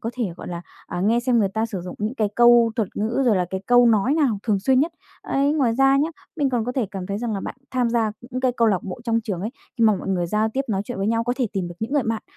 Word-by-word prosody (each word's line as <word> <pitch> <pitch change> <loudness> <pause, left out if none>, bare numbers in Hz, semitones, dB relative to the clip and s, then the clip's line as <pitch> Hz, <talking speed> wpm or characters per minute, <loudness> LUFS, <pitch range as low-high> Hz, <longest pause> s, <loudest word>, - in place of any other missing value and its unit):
có 230 - -3
thể, 245 -2 -2
gọi - - -8
là, 170 0 -5 0.2
à, 175 - -4
nghe 225 +5 +2
xem 245 -1 +2
người 200 -3 +2
ta 220 +3 -1
sử 200 -6 -5
dụng 180 +1 -7
những 215 +5 -2
cái 215 -5 0
câu 240 -1 +6
thuật 215 -5 0
ngữ 225 +6 0
rồi 215 -5 +4
là 180 - +1
cái 190 0 -3
câu 245 0 +6
nói 230 +5 +3
nào 265 -10 +1
thường 210 -4 +1
xuyên 260 +4 +3
nhất. 330 +3 0 0.3
Ấy, 280 +2 +1
ngoài 255 -7 +1
ra 270 +1 +4
nhá, 300 +3 +2 0.3
mình 285 -3 +1
còn 240 -3 0
có 250 - -3
thể 250 -6 -1
cảm 190 -2 -5
thấy 200 +1 -3
rằng 235 -2 -2
là 195 - -3
bạn - - -6 0.2
tham 250 -2 +1
gia 225 -3 +1 0.2
những 255 - -3
cái 255 -1 +2
câu 230 -1 +4
lạc 190 -4 +1
bộ 190 +4 -7
trong 230 -1 +1
trường 200 -6 -4
ấy, 215 - -3 0.3
khi 230 - +4
mà 215 - +6
mọi 190 - -6
người 175 -2 0
giao 215 +4 +1
tiếp 265 +5 -1
nói 195 -2 0
chuyện 245 -2 -6
với 195 - -1
nhau 230 +1 +1
có 245 - 0
thể 250 -3 +1
tìm 185 -3 -2
được 175 - -9
những 230 +5 -3
người 290 -3 +2
bạn 225 -1 -2
230 Hz, 315 wpm, -23 LUFS, 200-250 Hz, 0.3 s, câu